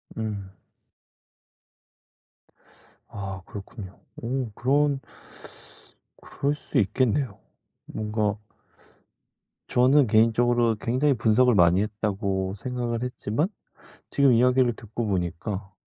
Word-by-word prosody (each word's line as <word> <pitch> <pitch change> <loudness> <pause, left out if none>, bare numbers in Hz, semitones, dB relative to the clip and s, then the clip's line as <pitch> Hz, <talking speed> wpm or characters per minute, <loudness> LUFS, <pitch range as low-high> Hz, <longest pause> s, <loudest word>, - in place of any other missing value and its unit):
음. 105 -3 -4 2.6
아 95 -1 -6
그렇군요. 100 -1 -9 0.2
어 125 -1 -2
그런 140 +2 +2 1.2
그럴 145 +1 -2
수 - - -4
있겠네요. 120 +2 0 0.5
뭔가 105 -1 -2 1.3
저는 130 +2 +4
개인적으로 115 +1 +3
굉장히 130 +7 +1
분석을 120 +1 +3
많이 90 -1 +5
했다고 100 -2 -2
생각을 120 +1 -3
했지만 125 - -1 0.6
지금 140 -2 +4
이야기를 125 0 +4
듣고 115 +1 -5
보니까 95 +1 -3
115 Hz, 200 characters per minute, -25 LUFS, 100-125 Hz, 2.6 s, 많이